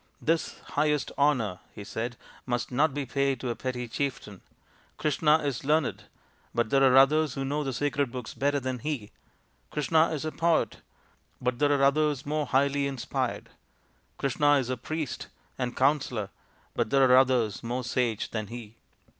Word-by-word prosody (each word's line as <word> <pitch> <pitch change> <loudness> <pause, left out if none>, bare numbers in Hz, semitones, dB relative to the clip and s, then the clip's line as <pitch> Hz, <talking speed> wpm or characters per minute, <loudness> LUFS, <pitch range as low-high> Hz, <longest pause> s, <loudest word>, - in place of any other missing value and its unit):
" - - -40
This 165 0 0
highest 150 -1 +1
honour," 125 -10 +1 0.2
he 105 - -7
said, 115 +3 -4
" - - -24
must 120 0 -2
not 145 +5 +3
be 145 0 -3
paid 140 0 0
to 125 -1 -2
a - - -3
petty 125 -2 -4
chieftain. 120 -6 -4 0.6
Krishna 150 +1 +3
is 140 -5 -2
learned, 150 0 +1 0.5
but 120 -2 0
there 135 0 +4
are 130 -1 +6
others 145 +1 +5
who 135 - -2
know 145 +2 -1
the 135 - -2
sacred 140 0 -1
books 125 -2 -6
better 145 +1 +1
than 130 -1 -3
he. 125 -6 -4 0.6
Krishna 160 +2 +2
is 155 -1 -3
a 155 - -2
poet, 165 -9 +1 0.6
but 125 -1 -1
there 145 0 +3
are 140 -1 +3
others 145 -1 +2
more 150 0 -1
highly 140 +1 +2
inspired. 135 -3 -3 0.7
Krishna 145 +2 +2
is 130 -3 +1
a - - 0
priest 155 +3 -4 0.3
and 125 -1 -3
counsellor, 130 -7 +1 0.4
but - - 0
there 135 +1 +5
are 125 - +6
others 125 -6 +3
more 125 +2 -3
sage 120 -3 -1
than 110 -2 -3
he." 115 0 -9
135 Hz, 170 wpm, -28 LUFS, 120-145 Hz, 0.7 s, are